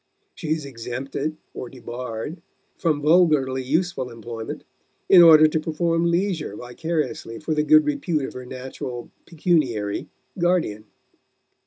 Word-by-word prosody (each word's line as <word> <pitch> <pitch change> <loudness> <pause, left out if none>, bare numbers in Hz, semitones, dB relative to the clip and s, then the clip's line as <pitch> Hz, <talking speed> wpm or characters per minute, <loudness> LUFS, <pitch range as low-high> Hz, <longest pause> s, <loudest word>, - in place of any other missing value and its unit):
She - - -8
is 155 -2 0
exempted, 135 +4 -4 0.2
or 125 - -6
debarred, 125 +5 -6 0.3
from 155 -4 0
vulgarly 150 -5 +4
useful 150 0 -1
employment 115 -1 -7 0.4
in 185 - +8
order 155 -2 +9
to 155 +1 0
perform 165 +2 0
leisure 170 - -1
vicariously 150 0 -3
for 155 0 -2
the 150 - +2
good 310 - +5
repute 195 - -1
of - - -7
her 125 0 -8
natural 125 -1 -7 0.2
(pecuniary) 145 - 0 0.3
guardian. 170 - +1
150 Hz, 125 wpm, -23 LUFS, 125-165 Hz, 0.4 s, order